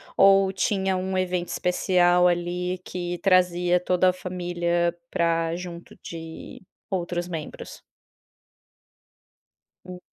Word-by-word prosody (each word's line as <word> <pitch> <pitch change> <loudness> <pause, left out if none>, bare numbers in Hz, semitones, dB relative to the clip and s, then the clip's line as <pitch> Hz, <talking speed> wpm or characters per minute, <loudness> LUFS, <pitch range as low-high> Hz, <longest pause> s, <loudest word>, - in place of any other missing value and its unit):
ou 195 0 +5
tinha 190 -1 0
um 185 0 -2
evento 180 -1 -1
especial, 180 0 +3
ali, 180 +1 -1
que 175 -1 -5
trazia 180 -1 +3
toda 180 +1 +2
a 180 - +1
família 175 -1 -1
pra 165 -1 0
junto 175 -1 -8
de 165 -1 -9 0.3
outros 175 -2 -2
membros? 165 -4 -7 2.0
Hum. 180 -1 -9
180 Hz, 100 wpm, -25 LUFS, 175-185 Hz, 2.0 s, ou